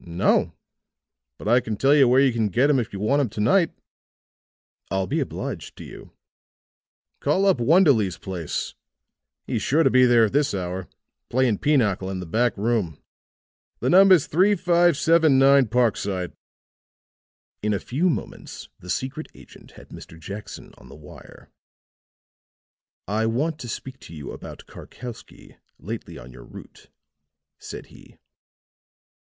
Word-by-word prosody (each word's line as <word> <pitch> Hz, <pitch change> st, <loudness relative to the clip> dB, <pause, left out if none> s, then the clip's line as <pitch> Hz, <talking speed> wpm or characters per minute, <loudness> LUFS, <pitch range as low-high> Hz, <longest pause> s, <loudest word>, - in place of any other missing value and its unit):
"No. 85 Hz, +1 st, 0 dB, 0.8 s
But -, -, -8 dB
I 120 Hz, +3 st, +5 dB
can 110 Hz, -4 st, -5 dB
tell 135 Hz, +5 st, +3 dB
you 140 Hz, -3 st, +5 dB
where 125 Hz, +2 st, +4 dB
you 135 Hz, -3 st, +3 dB
can 115 Hz, -2 st, 0 dB
get 130 Hz, +9 st, +2 dB
him 135 Hz, -, +2 dB
if 115 Hz, -, -4 dB
you 100 Hz, -, -7 dB
want 135 Hz, +8 st, +1 dB
him 130 Hz, -, -1 dB
to 105 Hz, -, -9 dB
night." 160 Hz, -, +3 dB, 1.2 s
"I'll 95 Hz, +1 st, -1 dB
be -, -, -2 dB
obliged -, -, -5 dB
to -, -, -9 dB
you." -, -, -12 dB, 1.1 s
"Call 170 Hz, +8 st, +1 dB
up 195 Hz, -7 st, +3 dB
Wonderleigh's 130 Hz, -, +3 dB
place; 90 Hz, -5 st, -5 dB, 0.7 s
he's -, -, -2 dB
sure 155 Hz, +4 st, +2 dB
to -, -, +3 dB
be 130 Hz, 0 st, +5 dB
there 120 Hz, -2 st, +5 dB
at 110 Hz, -, -4 dB
this 145 Hz, -5 st, +1 dB
hour, 90 Hz, 0 st, -4 dB, 0.4 s
playing 125 Hz, -4 st, +1 dB
pinochle 110 Hz, -11 st, +1 dB
in 95 Hz, -1 st, -4 dB
the 90 Hz, -, -6 dB
back 115 Hz, +7 st, 0 dB
room. 105 Hz, -7 st, -1 dB, 0.8 s
The -, -, 0 dB
number's 185 Hz, -3 st, +6 dB
35 175 Hz, -2 st, +2 dB
79 140 Hz, -5 st, +4 dB
Parkside." 105 Hz, -6 st, -1 dB, 1.3 s
In 105 Hz, -, -1 dB
a 100 Hz, -, +1 dB
few 155 Hz, -, -1 dB
moments 160 Hz, -, -6 dB
the 90 Hz, -, -13 dB
secret 135 Hz, -, -4 dB
agent -, -, -16 dB
had -, -, -15 dB
Mr. 80 Hz, -, -12 dB
Jackson 100 Hz, +5 st, -9 dB
on -, -, -16 dB
the 70 Hz, -, -12 dB
wire. 75 Hz, 0 st, -15 dB, 1.6 s
"I 110 Hz, +3 st, 0 dB
want 150 Hz, +8 st, -1 dB
to 125 Hz, -, -7 dB
speak 130 Hz, +4 st, -7 dB
to 80 Hz, -, -12 dB
you 75 Hz, -2 st, -8 dB
about -, -, -10 dB
Karkowsky, 120 Hz, -2 st, -12 dB, 0.2 s
lately -, -, -8 dB
on -, -, -12 dB
your -, -, -13 dB
route," -, -, -14 dB, 0.7 s
said -, -, -9 dB
he. -, -, -18 dB
120 Hz, 150 wpm, -23 LUFS, 100-145 Hz, 1.6 s, number's